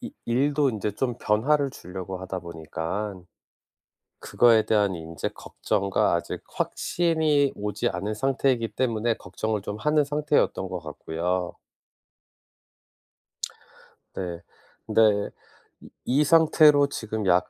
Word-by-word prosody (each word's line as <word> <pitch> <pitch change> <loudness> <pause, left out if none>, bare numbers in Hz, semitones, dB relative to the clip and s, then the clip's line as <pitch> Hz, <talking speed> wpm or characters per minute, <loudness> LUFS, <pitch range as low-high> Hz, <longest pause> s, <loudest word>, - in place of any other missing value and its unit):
이 250 +2 -7
일도 140 +3 +2
인제 105 -2 -3
좀 120 +2 -2
변화를 140 +6 +2
주려고 95 -3 -7
하다 95 0 -4
보니깐 85 +3 -5 0.9
그거에 115 -3 +4
대한 105 -3 +2
인제 80 0 -5
걱정과 100 0 -1
아직 - - -2
확신이 160 -5 +1
오지 105 0 -2
않은 100 +4 -3
상태이기 130 -1 +1
때문에 115 -2 0
걱정을 105 +3 -3
좀 105 +1 -5
하는 150 +4 +2
상태였던 145 -9 0
것 90 -1 -4
같고요. 85 +3 -3 2.6
네. 85 -2 -5 0.4
근데 115 - +3 0.2
이 - - -6 0.8
이 140 +4 +3
상태로 150 -2 +5
지금 110 -4 -4
약 90 0 +3
110 Hz, 235 characters per minute, -25 LUFS, 95-140 Hz, 2.6 s, 상태로